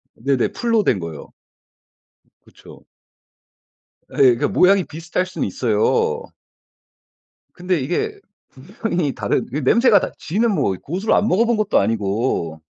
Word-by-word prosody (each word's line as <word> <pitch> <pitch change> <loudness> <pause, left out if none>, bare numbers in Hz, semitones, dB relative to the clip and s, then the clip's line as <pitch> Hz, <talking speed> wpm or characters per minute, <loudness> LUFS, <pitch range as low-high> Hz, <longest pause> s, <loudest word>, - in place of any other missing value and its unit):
네네. 135 +1 0
풀로 230 -3 0
된 110 - +1
거예요. 80 -4 -8 1.2
그쵸. - - -17 1.3
예예. 130 -3 +5
그 145 - 0
모양이 190 +5 +3
비슷할 165 +3 -4
수는 185 - -4
있어요. 130 - 0 1.3
근데 180 -1 -1
이게 405 - -3 0.6
분명히 175 - -1
다른 105 -4 -1
그 135 - -3
냄새가 225 - +4
다 - - -4
지는 215 +5 0
뭐 95 - 0
고수를 185 +8 -1
안 210 - +2
먹어 220 +4 +2
본 235 -1 +1
것도 215 -1 +2
아니고. 100 -6 -1
170 Hz, 250 characters per minute, -20 LUFS, -, 1.3 s, 예예